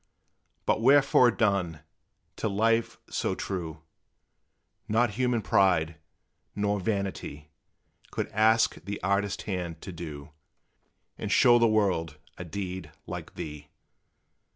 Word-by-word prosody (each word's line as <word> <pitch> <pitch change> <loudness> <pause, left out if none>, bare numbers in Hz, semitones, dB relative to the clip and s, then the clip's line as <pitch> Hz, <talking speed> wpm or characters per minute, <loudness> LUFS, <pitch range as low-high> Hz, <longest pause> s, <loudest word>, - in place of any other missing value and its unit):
But - - +1
wherefore 135 -1 +6
done, 100 -9 0 0.6
to 110 - -1
life 115 +3 +1
so - - -1
true? 80 -5 -5 1.0
Not 115 +1 +2
human 120 0 0
pride, 85 -5 +2 0.6
nor 105 0 0
vanity 95 -7 -3 0.6
Could - - -3
ask 110 +2 +3
the 100 +3 -5
artist 100 +1 0
hand 90 -5 -4
to 95 - -6
do, 80 -3 -8 0.9
And - - -3
show 120 -1 +6
the 115 - +5
world 95 -8 +1 0.2
a - - -4
deed 90 -1 -5 0.2
like - - -7
thee. 75 -1 -7
100 Hz, 110 wpm, -28 LUFS, 85-110 Hz, 1.0 s, wherefore